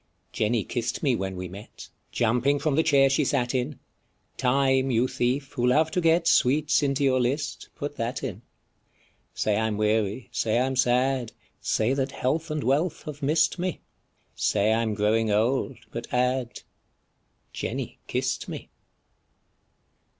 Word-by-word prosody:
Jenny 110 0 +1
kiss'd 120 - -3
me 135 -5 +3
when 95 -2 -3
we 90 0 -5
met, 100 +4 -11 0.2
Jumping 125 +5 +2
from 150 0 0
the 160 - +4
chair 140 -3 +4
she 135 +3 +2
sat 125 -3 0
in, 130 +1 -2 0.6
Time, 135 +1 +2
you 120 0 +2
thief, 130 +3 -1
who 125 -2 0
love 155 +5 +3
to 180 - 0
get 165 +1 +3
Sweets 145 0 +3
into 140 -1 0
your 130 -2 +3
list, 140 +4 -2
put 145 0 -5
that 120 +2 -3
in: 110 -6 -5 0.9
Say 105 -1 +1
I 110 +1 +1
'm 105 -2 -2
weary, 110 +2 0
say 110 0 0
I 125 - +3
'm 135 0 -2
sad, 125 -1 +1 0.3
Say 110 +4 +1
that 135 0 -1
health 155 +6 -1
and 155 -1 -2
wealth 150 +6 0
have 150 0 -8
miss'd 155 +5 +2
me. 180 0 -2 0.5
Say 105 +1 +2
I 115 - +2
'm 110 -2 -1
growing 110 +2 +2
old, 115 +5 +1
but 115 - -6
add, 125 0 0 0.9
Jenny - - -4
kiss'd - - -2
me. - - -8
130 Hz, 155 wpm, -26 LUFS, 115-140 Hz, 0.9 s, the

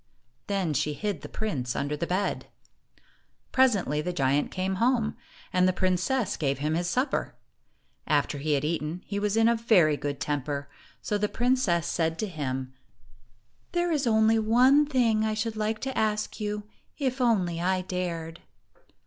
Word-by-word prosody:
Then 195 -6 0
she 150 +2 0
hid 200 -2 -3
the - - -8
prince 135 - -3
under 145 +1 -1
the 170 +3 -3
bed. 190 +3 -1 1.0
Presently, 205 - +3
the 180 +3 -2
giant 140 -3 +1
came 190 +1 -2
home, 235 -2 +2 0.4
and 185 0 +4
the 185 - +2
prin 185 0 +1
cess 245 +5 -1
gave 140 -3 0
him 150 +3 -1
his 175 +2 0
supper. 255 +10 -1 0.7
After 145 - +1
he 150 +2 0
had 140 0 +1
eaten, 160 +2 -2
he 200 -1 -3
was 210 +1 0
in 225 0 +5
a 235 - +4
very 185 -10 +4
good 145 -1 -4
temper, 145 -1 -2 0.4
so 210 - -1
the 210 0 0
princess 240 -9 +1
said 165 -1 0
to 215 - -2
him, 130 -6 -4 1.0
"There 350 0 +1
is 280 -6 +1
one 225 +6 +4
thing 235 -6 +2
I 215 0 0
should 220 +1 -2
like 215 +1 -1
to 265 0 -3
ask 215 0 -1
you, 210 0 -3 0.3
if 265 -2 -1
only 185 -8 +1
I 185 +1 +1
dared." 175 -3 -4
190 Hz, 165 wpm, -27 LUFS, 155-225 Hz, 1.0 s, in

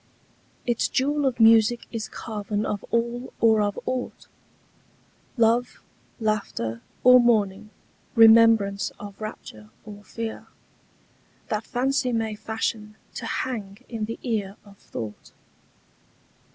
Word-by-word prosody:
Its 240 -2 +1
jewel 285 +2 +1
of 250 -2 -2
music 225 +1 +5
is 225 -2 -4
carven 210 -1 -4
of 205 - -3
all 235 +2 -1
or 220 -2 +4
of 205 -1 -1
aught— 255 -1 -4 1.1
Love, 235 +1 +2 0.4
laughter, 200 - -2 0.2
or 250 0 +8
mourning—remembrance 220 -1 +3
of 205 0 -10
rapture 110 - -8 0.2
or 205 -1 -11
fear— 225 +1 -6 1.0
That 215 0 -2
fancy 255 0 0
may 225 -1 -1
fashion 215 0 -4 0.2
to - - -5
hang 220 -2 -4
in 225 -3 -4
the 230 +2 -6
ear 210 -5 -2
of 200 -1 -17
thought. 105 -2 -8
220 Hz, 110 wpm, -25 LUFS, 205-235 Hz, 1.1 s, or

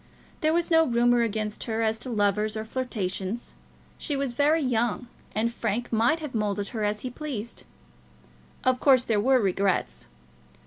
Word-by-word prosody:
There 310 - +2
was 340 +1 0
no 325 0 +6
rumour 240 -2 +3
against 215 -2 -2
her 225 -1 -1
as 220 0 0
to 255 - -5
lovers 210 -1 +1
or 220 - -4
flirtations. 220 -3 -3 0.5
She 290 - -2
was 275 -3 -2
very 295 +5 +2
young, 240 -1 0 0.3
and 230 +2 0
Frank 230 +1 -2
might 235 +9 +2
have 300 -4 -6
moulded 205 -2 -1
her 220 -3 -3
as 210 0 -1
he 255 - -5
pleased. 245 -5 -6 1.0
Of 255 -1 +2
course 260 -4 +6
there 220 -4 +1
were 260 +3 +4
regrets. 190 - 0
230 Hz, 165 wpm, -26 LUFS, 210-255 Hz, 1.0 s, no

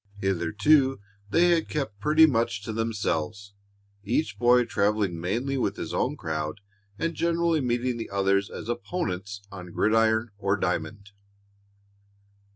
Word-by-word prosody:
Hitherto 105 - +2 0.3
they 175 +8 +4
had 165 -1 +1
kept 125 -9 -3
pretty 155 +8 +6
much 115 -8 0
to 110 - -4
themselves, 105 -3 -2 0.5
each 120 +10 -1
boy 125 0 +5
traveling 100 -6 0
mainly 120 +10 -1
with - - 0
his - - -5
own - - 0
crowd 75 +2 -3 0.4
and 165 +7 -1
generally 170 -1 +1
meeting 125 0 0
the 115 - -5
others 100 0 +1
as - - -8
opponents 100 - -4
on 90 -2 -9
gridiron 110 +3 +2
or 100 0 +1
diamond. 105 +1 -3
110 Hz, 130 wpm, -26 LUFS, 100-130 Hz, 0.5 s, pretty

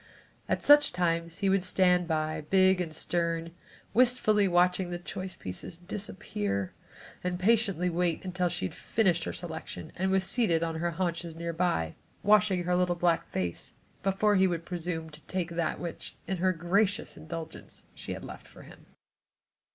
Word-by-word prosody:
At - - 0
such 290 0 +6
times 170 -1 0
he 200 - 0
would 195 0 +3
stand 180 -1 +3
by, 155 -1 -1
big 190 -1 +5
and 165 -3 -3
stern, 165 +1 -1 0.4
wistfully 215 -4 +4
watching 180 0 +2
the 175 - -3
choice 185 +1 -6
pieces 95 - -7
disappear, 105 - -3 0.5
and 180 0 -1
patiently 195 -3 +2
wait 175 0 0
until 180 -1 0
she 95 - -2
had - - -4
finished 180 -7 +1
her - - -2
selection 90 - -6
and 190 +2 0
was 190 0 +2
seated 190 -6 +2
on 165 -1 -2
her 175 +1 0
haunches 170 -1 -3
near 170 0 -4
by, 160 - 0 0.3
washing 205 -3 +4
her 180 +1 +1
little 180 -1 +2
black 170 -1 +1
face, 90 -2 -4 0.3
before 200 +2 +2
he 190 0 +5
would 170 -2 -3
presume 165 -2 -4
to 150 +1 -11
take 180 -2 -2
that 170 -2 -1
which, 170 -2 -6
in 190 +1 -2
her 185 +2 +2
gracious 185 +4 0
indulgence, 160 +1 -8
she - - -6
had - - -7
left - - -10
for - - -14
him. - - -15
175 Hz, 165 wpm, -29 LUFS, 165-190 Hz, 0.5 s, such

